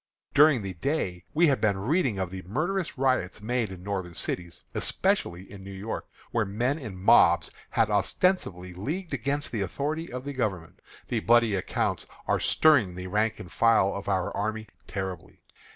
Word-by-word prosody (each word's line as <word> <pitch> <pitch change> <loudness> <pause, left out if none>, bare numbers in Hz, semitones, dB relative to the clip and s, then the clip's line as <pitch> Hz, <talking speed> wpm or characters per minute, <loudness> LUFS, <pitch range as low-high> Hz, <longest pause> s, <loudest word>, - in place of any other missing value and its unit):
During 145 -6 +6
the 95 -1 -4
day 90 - -2
we 170 +3 +5
have 135 - +1
been 100 -3 +2
reading 125 - +1
of 95 -2 -2
the 95 -1 -6
murderous 170 - -1
riots 130 -8 +1
made 115 -1 -1
in 90 -1 -9
Northern 95 -4 -4
cities, 85 +1 -4
especially 90 +1 0
in 100 -2 -10
New 100 - -9
York, 100 +3 -5 0.2
where 115 - +2
men 120 +9 -1
in 110 -9 -7
mobs 95 - +5 0.2
have 110 -2 +2
ostensibly 100 - +1
leagued 155 - -4
against 140 +3 -1
the 110 - -2
authority 150 - -3
of 125 +1 -5
the 145 - -4
Government. 95 -8 -3 0.3
The 120 - +1
bloody 115 -1 +4
accounts 95 - -1 0.2
are - - +2
stirring 125 - +4
the 90 0 -6
rank 105 +4 0
and 90 - -9
file 115 -4 +4
of 100 0 -5
our 95 -2 0
army 110 +1 -2 0.2
terribly. 95 -3 -6
105 Hz, 170 wpm, -27 LUFS, 95-135 Hz, 0.3 s, During